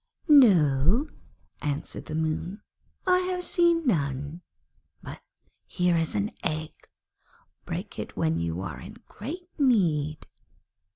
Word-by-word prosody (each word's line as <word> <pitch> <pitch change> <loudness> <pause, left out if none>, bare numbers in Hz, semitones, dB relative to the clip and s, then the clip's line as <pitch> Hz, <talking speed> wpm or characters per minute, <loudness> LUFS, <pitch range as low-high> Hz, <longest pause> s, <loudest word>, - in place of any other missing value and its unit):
'No,' 195 - +5 0.6
answered 145 +1 -4
the 155 - -4
Moon, 160 +5 -2 0.4
'I 365 -1 +4
have 365 0 -2
seen 340 -2 +2
none; 145 - -1 0.6
but - - -9 0.5
here 180 -1 +1
is 165 -6 0
an 100 -1 0
egg. 155 -1 -2 0.9
Break - - -5
it - - -7
when 80 +1 +1
you 85 +1 -2
are - - -6
in - - -10
great 335 - -7
need.' 160 - +2
165 Hz, 115 wpm, -27 LUFS, -, 0.9 s, No